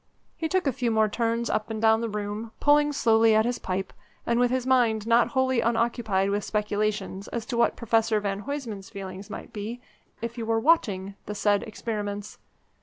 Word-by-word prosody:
He 320 - -3
took 375 -1 +1
a 275 - +1
few 250 -3 -1
more 220 -1 +3
turns 230 +2 -1
up 215 +1 -1
and 220 -1 -3
down 220 0 +4
the 230 - -2
room, 210 +2 -4
pulling 295 0 +4
slowly 225 -4 +4
at 220 0 +4
his 245 0 -1
pipe, 190 +1 -3 0.3
and 235 0 +1
with 245 0 +4
his 255 0 -1
mind 235 -5 +2
not 230 +1 +4
wholly 260 -3 +1
unoccupied 225 -4 +1
with 205 0 0
speculations 210 -2 -2
as 235 -2 -4
to 245 - -4
what 235 - +3
Professor 225 -2 +1
Van 200 -1 -2
Huysman's 235 -9 -5
feelings 195 +1 -8
might - - -8
be 220 +3 -5 0.4
if 230 +1 -5
he - - -3
were 225 0 +1
watching 205 - +2
the 210 - -4
said 205 0 +2
experiments. 210 -2 -5
225 Hz, 190 wpm, -26 LUFS, 205-235 Hz, 0.4 s, down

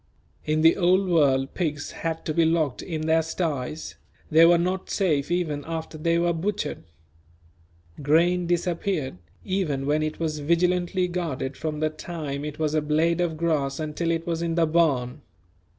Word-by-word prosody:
In 155 +1 +1
the 165 +1 +5
Old 185 +1 +3
World 135 -6 +2
pigs 150 -5 -2
had 165 -1 -4
to 155 - -1
be 165 - +3
locked 160 -4 +1
in 160 -4 -4
their 160 +1 +3
sties; 155 -3 -3 0.3
they 160 +2 +7
were 175 0 +6
not 185 +2 -2
safe 155 -8 0
even 165 -5 -1
after 160 -1 -5
they 165 +2 +1
were 170 0 +2
butchered. 195 - -3 1.2
Grain 170 +5 +3
disappeared, 170 - -1 0.3
even 160 -8 -1
when 150 +2 +1
it 155 0 -3
was 155 -2 -2
vigilantly 180 +3 +1
guarded 160 -7 -3
from 155 0 -4
the 155 0 +1
time 155 -4 -5
it 150 0 -5
was 155 -1 -1
a 155 - +2
blade 160 +3 +1
of 165 -3 -1
grass 155 -4 0
until 155 +2 -2
it 165 0 -1
was 165 -1 -2
in 165 -1 -1
the 170 -1 +3
barn. 150 -7 +1
160 Hz, 165 wpm, -25 LUFS, 150-175 Hz, 1.2 s, they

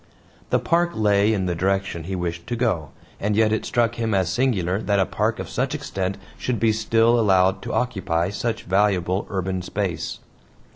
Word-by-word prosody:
The - - +3
park 170 +1 +1
lay 105 0 +3
in 100 -4 0
the 90 - 0
direction 95 -2 -1
he 95 +2 -3
wished 85 -1 -4
to 120 - -2
go, 105 - 0 0.3
and 105 +1 0
yet 110 0 +3
it 110 - -1
struck 120 -1 0
him 110 -3 0
as 95 -3 +1
singular 100 -5 0
that 100 -2 +1
a 95 - +3
park - - -1
of - - -5
such - - -1
extent 95 0 -3 0.2
should 125 -3 -1
be 115 -1 +3
still 115 +2 +3
allowed 95 -2 +3
to - - -5
occupy 95 -7 0
such 115 +2 -2
valuable 95 -1 +1
urban 95 -1 -2
space. 95 -1 -3
100 Hz, 185 wpm, -23 LUFS, 95-115 Hz, 0.3 s, The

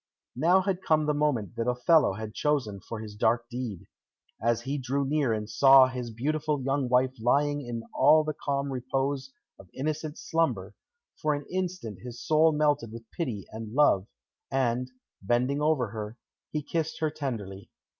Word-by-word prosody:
Now 175 +8 +4
had 190 -1 -1
come 155 -4 +2
the 150 - +1
moment 135 -8 0
that 115 +1 -1
Othello 125 - +4
had 110 +1 -6
chosen 130 -10 0
for 110 +2 -7
his 105 -2 -8
dark 115 +3 +1
deed. 120 -7 -5 0.6
As 115 0 +1
he 140 +2 -2
drew 135 +2 -1
near 140 -3 +1
and 105 -1 -2
saw 135 +4 +7
his 125 -2 -5
beautiful 150 +6 -1
young 135 0 -1
wife 125 +1 +3
lying 145 +5 +2
in 120 -2 -5
all 155 +1 +5
the 155 0 -2
calm 140 -1 -2
repose 135 +1 -2 0.3
of 95 - -15
innocent 155 +2 -3
slumber, 165 0 -1 0.5
for 150 -1 +2
an 145 0 -6
instant 180 - -3
his 120 +4 -9
soul 155 +5 +4
melted 150 -6 +1
with 115 0 -11
pity 120 - -4
and 110 +1 -7
love, 110 -10 +4 0.4
and, 125 -1 0 0.3
bending 125 +8 +1
over 150 -7 +2
her, 110 +1 -6 0.3
he 150 -1 -3
kissed 160 +1 -2
her 155 -1 0
tenderly. 110 -10 -5
135 Hz, 165 wpm, -28 LUFS, 115-150 Hz, 0.6 s, saw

